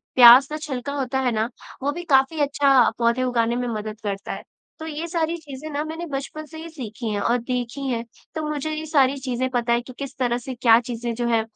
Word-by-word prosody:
प्याज़ 250 +3 +9
का 305 - -3
छिलका 280 -3 -4
होता 265 -2 -1
है 255 -2 +1
ना, 220 +1 0 0.3
वो 285 - +1
भी 345 +4 -6
काफ़ी 280 -1 +3
अच्छा 275 -3 +4
पौधे 235 +2 +2
उगाने 235 -2 +1
में 245 0 -1
मदद 215 -1 -4
करता 200 -1 -3
है। - - -7 0.4
तो 320 - -6
ये 315 +2 -4
सारी 335 -1 -1
चीज़ें 300 -1 -9
ना 290 +1 -1
मैंने 320 +2 -5
बचपन 285 +2 -5
से 315 +1 -11
ही 325 +1 -7
सीखी 235 -7 -6
हैं 205 - -1
और 240 +4 +2
देखी 245 +2 -3
हैं, 235 -2 -1 0.3
तो 315 - -2
मुझे 300 +1 -2
ये 310 +1 -4
सारी 280 -3 +3
चीज़ें 260 -1 -2
पता 240 -2 +1
है 235 - +2
कि 255 +1 -11
किस 275 -1 -6
तरह 245 -2 +1
से 255 +2 -6
क्या 235 -2 +6
चीज़ें 235 0 -4
जो 240 +1 -1
है, 230 -1 +3
260 Hz, 235 wpm, -23 LUFS, 235-295 Hz, 0.4 s, प्याज़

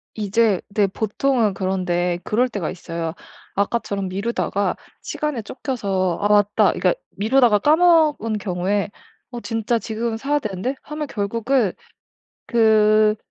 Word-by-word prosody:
이제 210 -1 +1
네 200 0 +2
보통은 220 +2 0
그런데 180 -2 -1
그럴 245 +4 +1
때가 200 -8 -3
있어요. 165 -2 -5 0.4
아까처럼 200 -1 -1
미루다가 200 -1 -1 0.3
시간에 300 -6 -3
쫓겨서 200 - -2
'아 205 - +2
맞다.' 205 0 +3
그러니까 - - +2 0.2
미루다가 225 0 +3
까먹은 310 - +3
경우에 195 +2 -1 0.4
'어 240 - -5
진짜 230 +1 -1
지금은 225 0 -3
사야 290 +4 0
되는데.' 215 +3 -3
하면 300 0 -5
결국은 230 0 0 0.7
그 215 -2 +4
215 Hz, 290 characters per minute, -21 LUFS, 195-240 Hz, 0.7 s, 그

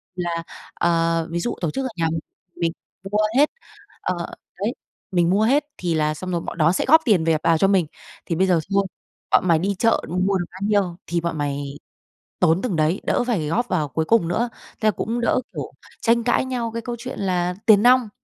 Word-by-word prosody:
là, 170 -2 -2 0.3
ờ, 165 -1 +1
ví 170 - -1
dụ 240 - -2
tổ 170 -4 0
chức 270 - -2
ở - - -2
nhà 165 -1 +1
mình, 165 - -1 0.4
mình 165 -1 0 0.4
mua 210 - +1 0.2
hết, 295 +2 +5 0.5
ờ, 175 -2 -2 0.3
đấy 210 +4 0 0.4
mình 175 -1 +3
mua 200 +3 +3
hết 275 +6 +3
thì 175 -2 -1
là 155 -1 +1
xong 185 +4 -6
rồi 175 - 0
bọn 165 - -7
đó 160 +1 +4
sẽ 180 - 0
góp 320 +3 +8
tiền 195 -9 +3
về 165 -1 +3
vào 165 -1 +3
cho 195 - +4
mình, 190 -4 +3 0.4
"Thì 170 - -1
bây 190 +3 +3
giờ 180 -3 +3
thôi 200 0 +3 0.4
bọn 185 - +3
mày 165 -2 +5
đi 195 +4 0
chợ 230 +2 +3
mua 180 +3 -3
mua 190 +1 +2
được 175 - -2
bao 185 - -12
nhiêu 195 -5 +1
thì 170 0 -1
bọn 165 -1 -3
mày 140 -1 -3 0.6
tốn 175 0 +3
từng 235 -8 -1
đấy, 160 +4 +1
đỡ - - +1
phải 190 -11 0
góp 240 +11 0
vào 160 -8 0
cuối 160 +4 -2
cùng 225 -5 +3
nữa." 235 +8 0 0.3
Thế 215 - +2
là - - +5
cũng 230 +4 -3
đỡ, 240 - +2
kiểu, - - -5 0.3
tranh 235 0 +3
cãi 240 +2 +2
nhau 245 -3 -2
cái 230 - -3
câu 240 +1 -4
chuyện 255 +2 -6
là 180 -2 0
tiền 210 -2 +6
nong. 250 -2 +5
180 Hz, 230 wpm, -22 LUFS, 165-225 Hz, 0.6 s, góp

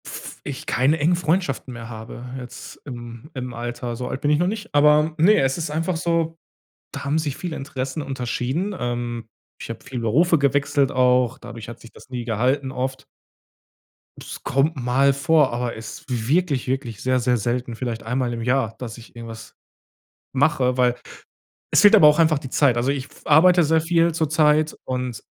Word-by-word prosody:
F - - -8
ich - - -6
keine 140 +6 +2
engen 165 +4 +3
Freundschaften 165 -6 -1
mehr 115 -1 -8
habe, 110 +2 -8
jetzt 125 -1 -10
im 120 0 -9
im 125 -2 -5
Alter. 120 0 -4
So 125 +1 -5
alt 130 - -5
bin 145 - +2
ich 150 - +3
noch 175 - +2
nicht, 215 +2 -5
aber 150 +2 +4
ne, 195 +7 +5
es 135 0 +1
ist 165 - -3
einfach 165 +4 -1
so, 165 -1 0 0.5
da - - -7
haben 145 +3 +1
sich 145 -3 -3
viele 175 -3 -5
Interessen 135 +1 -4
unterschieden. 135 +7 -2
Ähm, 120 -2 -4 0.3
ich - - -7
habe - - -7
viel 125 - -5
Berufe 155 +9 +3
gewechselt 140 0 +2
auch, 125 -1 +3
dadurch 115 -1 -9
hat 120 - -9
sich 115 - -14
das - - -16
nie 125 -2 -5
gehalten 130 +4 0
oft. 130 +1 -4 1.1
Das - - -9
kommt 140 +4 +1
mal 135 +2 +2
vor, 150 -1 +3
aber 120 0 -2
ist 110 0 -9
wirklich, 135 +4 0
wirklich 125 -5 -3
sehr, 130 0 +1
sehr 125 0 +2
selten, 120 +1 -2
vielleicht 115 -1 -4
einmal 125 +1 -1
im 115 - -4
Jahr, 125 -2 0
dass 115 -2 -7
ich 115 +1 -15
irgendwas 115 -1 -9 0.8
mache, 130 -2 +2
weil 125 -1 +3 0.8
es - - +5
fehlt 205 +1 +8
aber 155 -7 +8
auch 150 +1 +4
einfach 160 -3 +4
die 135 -3 -9
Zeit. 130 -4 +3
Also 120 +3 +1
ich 140 -1 -3
w - - -19
f - - -18
arbeite 175 +4 +6
sehr 160 +1 +3
viel 165 +1 +2
zurzeit 155 -1 +2
und 125 -3 -4
130 Hz, 185 wpm, -22 LUFS, 120-155 Hz, 1.1 s, fehlt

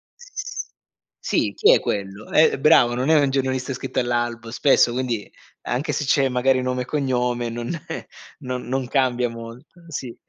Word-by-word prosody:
S 485 -1 -7 0.5
sì, - - 0
chi 450 +3 +5
è - - +4
quello? 100 +1 -4
Eh 155 -3 +4
bravo, 135 -5 +5
non 130 +4 -1
è 160 -1 +6
un 140 -1 +2
giornalista 130 -1 -1
iscritto 130 - -3
all'albo 120 -2 -2
spesso 125 0 +4
quindi, 120 -4 -2 0.3
anche 130 +6 -2
se - - -1
c'è 135 0 +3
magari 130 +1 +2
nome 125 0 -1
e - - -11
cognome 125 -4 -1
non 120 +1 -5 0.2
eh, - - -6 0.3
non 125 0 -5
non 130 0 -2
cambia 125 -2 +1
molto, 115 +9 -11
sì. 130 -6 -6
125 Hz, 170 wpm, -22 LUFS, 120-135 Hz, 0.5 s, è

